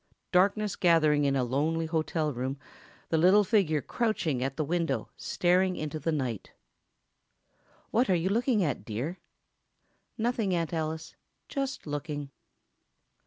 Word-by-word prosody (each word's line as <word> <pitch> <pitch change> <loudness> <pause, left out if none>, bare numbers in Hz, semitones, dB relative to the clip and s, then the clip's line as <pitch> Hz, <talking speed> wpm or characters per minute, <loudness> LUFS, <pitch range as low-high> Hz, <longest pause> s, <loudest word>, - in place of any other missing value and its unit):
Darkness 200 +3 +2
gathering 155 -4 +4
in 140 0 +2
a 130 - +2
lonely 155 +6 0
hotel 160 -1 -1
room—a 135 +5 -6
little 185 +6 +6
figure 180 - +2
crouching 175 - -1
at 135 0 -3
the 155 - 0
window, 170 +2 -1
staring 185 +1 +1
into 155 0 -4
the 165 - -1
night. 130 - -3 1.4
"What 240 +1 +2
are 185 - +4
you 175 +2 0
looking 230 0 +2
at, 140 - -1
dear?" 125 - -4 1.0
"Nothing, 225 -5 0
Aunt 170 0 -2
Alice—just 160 - -5
looking." 145 -1 -4
165 Hz, 120 wpm, -29 LUFS, 145-190 Hz, 1.4 s, little